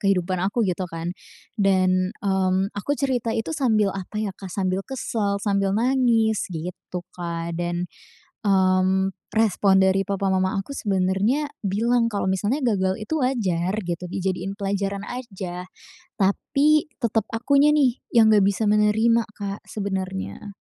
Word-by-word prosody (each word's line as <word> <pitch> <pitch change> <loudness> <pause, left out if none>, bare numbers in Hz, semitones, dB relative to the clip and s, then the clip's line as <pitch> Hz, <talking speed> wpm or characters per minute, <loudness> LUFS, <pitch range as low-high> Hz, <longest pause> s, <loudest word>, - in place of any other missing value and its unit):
kehidupan 185 -2 +1
aku 205 +5 0
gitu 180 0 -2
kan. 165 +1 -4 0.5
Dan, 185 -1 +3
mmm, 190 0 +1
aku 205 +8 -4
cerita 250 -4 0
itu 225 +8 -2
sambil 215 -8 +2
apa 195 +2 -6
ya, 210 -3 -2
Kak, 195 - -9
sambil 185 0 -1
kesel, 220 -6 -2
sambil 200 -2 +1
nangis, 230 -3 +2
gitu, 175 +1 -6
Kak. 170 -1 -4
Dan, 175 0 -2 0.6
mmm, 190 0 +3 0.2
respon 200 -3 +3
dari 190 +1 +3
papa 195 0 -1
mama 185 +2 +1
aku 195 +8 -4
sebenarnya 205 +7 0
bilang 230 +4 +1
kalau 205 -3 -2
misalnya 215 +9 0
gagal 190 -5 +1
itu 295 +9 -2
wajar 190 -9 0
gitu, 175 +1 -3
dijadiin 190 +1 -3
pelajaran 200 0 -2
aja. 190 -7 -6 0.5
Tapi, 280 +10 +3 0.2
tetap 225 -2 +1
akunya 280 +5 +4
nih, 265 -5 +3 0.2
yang 225 -2 +6
nggak 200 -2 +5
bisa 200 +2 +1
menerima, 220 +2 +3
Kak, 200 -1 -5
sebenarnya. 195 0 -4
200 Hz, 135 wpm, -23 LUFS, 185-225 Hz, 0.6 s, yang